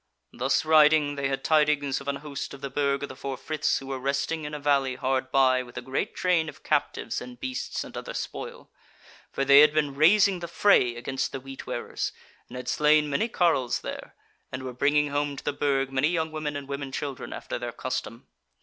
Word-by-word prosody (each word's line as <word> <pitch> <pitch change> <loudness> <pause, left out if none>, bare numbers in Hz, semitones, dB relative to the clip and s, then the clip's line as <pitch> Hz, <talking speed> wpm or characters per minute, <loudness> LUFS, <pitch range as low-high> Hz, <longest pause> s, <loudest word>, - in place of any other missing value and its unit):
Thus 130 +5 0
riding 155 -1 +5
they 140 -1 -1
had 135 0 -3
tidings 150 -3 +2
of 140 - -12
an 140 - 0
host 140 -1 -5
of 135 - -15
the 140 - -5
Burg 140 0 0
of 140 - -4
the 130 - -8
Four 135 0 -5
Friths 155 +2 0
who 135 - -7
were 135 -1 -4
resting 140 +4 -1
in 150 - -6
a - - -5
valley 140 -3 +1
hard 130 0 -1
by 130 -1 +4
with 120 -1 -11
a - - -3
great 135 +10 -3
train 175 -3 +1
of - - -14
captives - - -1
and 250 0 -10
beasts 265 +1 -3
and - - -11
other - - -6
spoil: 485 +1 -6 0.6
for 135 - -1
they 140 +1 +8
had 150 +1 +6
been 150 -2 +1
raising 185 +6 +4
the 170 - -5
fray 170 -9 +3
against 130 +3 -3
the 135 - -5
Wheat 135 +1 -10
wearers, - - -3 0.4
and 125 - -8
had 125 0 -7
slain 150 +1 +3
many 180 +11 +1
carles 170 - +1
there, - - -7 0.4
and 130 0 -5
were 130 -1 -5
bringing 145 +3 +2
home 145 0 -1
to - - -8
the - - -1
Burg 135 -2 0
many 135 +2 +2
young 160 -1 -1
women 155 -1 -4
and 140 -1 -5
women 140 -1 -5
children, 140 0 -5
after - - -5
their - - -4
custom. - - -5
140 Hz, 215 wpm, -26 LUFS, 135-155 Hz, 0.6 s, they